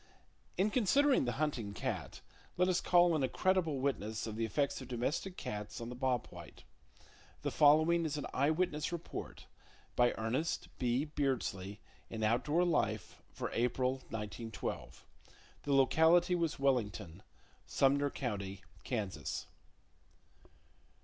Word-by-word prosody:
In 200 +3 +2
considering 260 - +3
the 120 - -1
hunting 125 -9 -2
cat, - - -4 0.4
let 180 +1 +3
us 185 -1 +2
call 175 -1 +5
in 155 - +1
a 130 - +1
credible 185 -6 +1
witness 110 -5 -1
of 110 -2 -5
the 115 +1 0
effects 140 +5 -1
of 130 - -8
domestic 140 +10 -2
cats 105 0 -5
on 115 0 -5
the 125 - -6
bob 125 -2 0
white. - - -11 0.8
The - - -1
following 155 +3 +5
is 150 -2 -2
an 145 - -3
eye 140 +3 +2
witness 155 -2 0
report, 170 -1 -6 0.5
by 120 0 +4
Ernest 120 +9 -1
B. 125 +3 +1
Beardsley, 120 -10 -2 0.3
in 110 -1 -4
Outdoor 140 +10 +2
Life 110 -11 -1
for - - -5
April, 125 +2 +1
1912. 110 +1 -5 0.6
The 145 - -1
locality 160 +6 +5
was 165 -2 0
Wellington, 105 -10 -1 0.5
Sumner 140 +1 +3
County, 100 -8 -4 0.2
Kansas. 105 -7 -3
135 Hz, 130 wpm, -34 LUFS, 115-160 Hz, 0.8 s, call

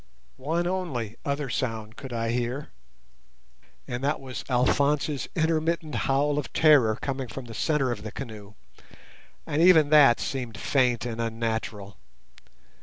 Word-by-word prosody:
One 160 +6 -1
only 160 - -3
other 140 0 -2
sound 115 -3 -3
could 135 0 -9
I 115 -1 -1
hear, 125 +4 -2 1.2
and 120 +1 -4
that 145 +2 0
was 130 -2 -7
Alphonse's 140 +3 +1
intermittent 160 -1 0
howl 145 +2 +1
of 145 - -6
terror 135 -9 +5
coming 135 -2 -3
from 125 +3 -8
the 115 - -9
centre 135 +2 0
of 110 -3 -4
the 110 - -7
canoe, 105 -5 -9 0.9
and 150 - 0
even 160 -4 +6
that 140 -6 +7
seemed 125 -5 -4
faint 125 -1 +1
and 115 -1 -3
unnatural. 110 -3 -3
130 Hz, 135 wpm, -26 LUFS, 115-150 Hz, 1.2 s, that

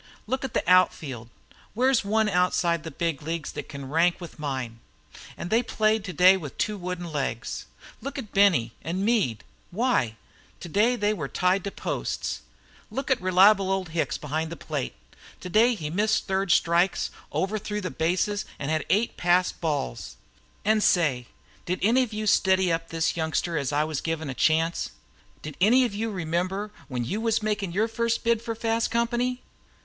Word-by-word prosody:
Look 260 +4 -2
at 265 - -5
the - - 0
out 185 +1 +5
field. 120 -6 -8 0.5
Where's 255 +1 +3
one 215 +2 +2
outside 180 -3 +2
of - - -18
the - - -4
big 160 -1 -2
leagues 165 +1 -4
thet - - -7
can 140 -2 -7
rank 165 +5 +2
with 170 -3 -10
mine? 130 -6 -4 0.6
An' 170 - -5
they 225 +4 +3
played 215 -3 +1
today 185 0 +5
with 150 -7 -8
two 210 +1 0
wooden 180 -2 -5
legs. 135 -6 -3 0.3
Look 275 +2 -5
at 230 -7 -6
Benny 180 - +4
an' 185 +5 -2
Meade 205 - +1 0.3
why, 195 - +1 0.4
today 210 +8 +2
they 210 -2 +1
were 155 -9 -4
tied 180 +5 +1
to 200 - -3
posts. - - -3 0.5
Look 270 0 -3
at 260 - +2
reliable 190 +1 +5
old 190 -3 -1
Hicks 160 0 -1
behind 155 +2 -3
the - - -4
plate 150 -5 -4 0.4
today 220 +7 +3
he 155 -7 -5
missed 210 +5 +1
third 190 0 -1
strikes, 170 +4 +2 0.2
overthrew 210 +1 -2
the 185 -4 -4
bases, 185 +5 0
an' 140 - -4
had 155 -1 0
eight 210 +6 +1
passed 180 +1 +2
balls. 145 - -3 0.5
An' 215 0 +3
say, 145 - +2 0.4
did 180 +1 0
any 235 +5 +4
of 250 -3 -2
you 215 0 -3
steady 190 -3 +3
up 165 0 -3
this 165 0 0
youngster 165 +1 -1
as 140 -3 -1
I 145 +1 +2
was 155 -2 -3
givin' 160 -3 -3
a - - -4
chance? 160 +4 +1 0.5
Did 150 -2 -7
any 245 +6 +5
of 235 - -3
you 225 +2 -2
remember 185 +3 -2 0.2
when 125 -3 -3
you 205 - -2
was 225 -1 +1
makin' 205 -4 -1
your 210 +6 +1
first 230 0 -1
bid 230 -1 +2
for 230 -1 -4
fast 225 0 0
company? 240 +2 0
185 Hz, 180 wpm, -26 LUFS, 160-215 Hz, 0.6 s, out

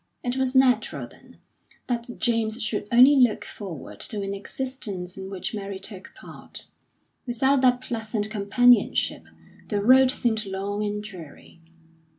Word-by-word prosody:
It 245 0 -2
was 265 0 -1
natural, 260 -1 +2
then, - - -19 0.5
that 240 -1 -3
James 230 -1 +1
should 210 -1 -2
only 255 +4 +7
look 250 -5 +3
forward 185 -8 -8
to 210 -4 -4
an 195 0 -3
existence 200 -4 -5
in 190 0 -7
which 190 +1 -4
Mary 200 -2 -5
took 190 0 -6
part; - - -8 0.6
without 265 +3 +2
that 250 -1 +3
pleasant 220 -3 -3
companionship 220 +2 +3 0.5
the 205 - 0
road 255 +5 +6
seemed 220 -5 0
long 200 +2 -3
and 210 0 -3
dreary. 170 -4 -12
215 Hz, 140 wpm, -25 LUFS, 200-250 Hz, 0.6 s, only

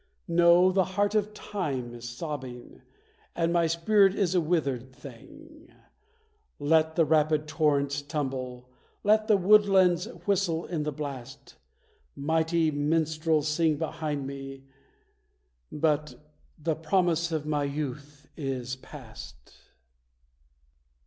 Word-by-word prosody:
No, 175 +2 +5
the 190 0 +3
heart 205 0 +2
of 210 -1 +1
Time 145 - -4
is 120 0 -8
sobbing, 130 -2 -7 0.5
and 170 0 0
my 170 -1 +3
spirit 195 +4 +3
is 190 -3 +1
a 180 - +3
withered 140 -6 -1
thing! 305 - -14 0.9
Let 160 +2 +2
the 165 - +4
rapid 155 0 +2
torrents 145 -2 +1
tumble, 130 -4 -4 0.4
let 215 +1 +3
the 210 - +5
woodlands 190 -3 +4 0.2
whistle 185 -5 0
in 165 -4 -3
the 150 0 -2
blast; 140 -1 -8 0.6
Mighty 160 +2 +1
minstrels 155 +1 0
sing 155 0 +1
behind 150 -2 -3
me, 135 0 -8 1.1
but 150 0 0 0.4
the 160 +1 -1
promise 170 0 +1
of 155 -2 -2
my 150 -1 0
youth 145 0 -6
is 130 -3 -4
past. - - -12
155 Hz, 110 wpm, -27 LUFS, 140-175 Hz, 1.1 s, No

